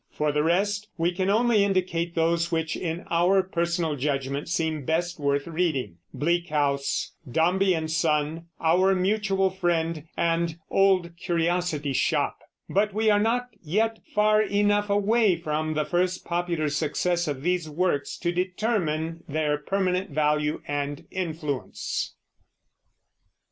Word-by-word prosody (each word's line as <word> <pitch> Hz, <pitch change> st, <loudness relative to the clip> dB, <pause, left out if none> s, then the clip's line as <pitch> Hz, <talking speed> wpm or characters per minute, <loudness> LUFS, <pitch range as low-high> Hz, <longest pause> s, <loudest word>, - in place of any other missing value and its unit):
For 150 Hz, 0 st, -1 dB
the 150 Hz, 0 st, +1 dB
rest, 200 Hz, +6 st, +1 dB
we 170 Hz, +1 st, +1 dB
can 185 Hz, +2 st, -1 dB
only 220 Hz, 0 st, +4 dB
indicate 180 Hz, -3 st, 0 dB
those 170 Hz, +1 st, +1 dB
which, 160 Hz, -1 st, -1 dB
in 170 Hz, 0 st, -4 dB
our 180 Hz, +3 st, +4 dB
personal 170 Hz, -3 st, -1 dB
judgment, 140 Hz, +1 st, -2 dB
seem 160 Hz, -3 st, -1 dB
best 170 Hz, +4 st, -1 dB
worth 140 Hz, -1 st, 0 dB
reading, 155 Hz, -, -1 dB
Bleak 170 Hz, +3 st, 0 dB
House, 140 Hz, -2 st, 0 dB, 0.2 s
Dombey 180 Hz, +6 st, +3 dB
and 160 Hz, -1 st, -3 dB
Son, 160 Hz, 0 st, 0 dB
Our 185 Hz, +4 st, +3 dB
Mutual 195 Hz, 0 st, +1 dB
Friend, 170 Hz, -4 st, -1 dB
and 165 Hz, -1 st, 0 dB
Old 185 Hz, -3 st, +3 dB
Curiosity 170 Hz, -4 st, 0 dB
Shop, -, -, +1 dB, 0.3 s
but 205 Hz, +1 st, +1 dB
we 220 Hz, 0 st, +3 dB
are 205 Hz, -, +4 dB
not 245 Hz, +3 st, +1 dB
yet 220 Hz, +7 st, 0 dB, 0.2 s
far 215 Hz, 0 st, +4 dB
enough 205 Hz, 0 st, +1 dB
away 205 Hz, 0 st, +3 dB
from 155 Hz, -1 st, -2 dB
the 155 Hz, 0 st, 0 dB
first 180 Hz, +3 st, 0 dB
popular 170 Hz, -3 st, -1 dB
success 170 Hz, +4 st, 0 dB
of 140 Hz, -2 st, -3 dB
these 175 Hz, -2 st, 0 dB
works 155 Hz, -2 st, -1 dB
to 175 Hz, -, +1 dB
determine 175 Hz, -4 st, -1 dB
their 150 Hz, 0 st, 0 dB
permanent 185 Hz, +2 st, -1 dB
value 150 Hz, 0 st, 0 dB
and 145 Hz, 0 st, -3 dB
influence. 160 Hz, -7 st, -3 dB
170 Hz, 135 wpm, -26 LUFS, 155-190 Hz, 0.3 s, only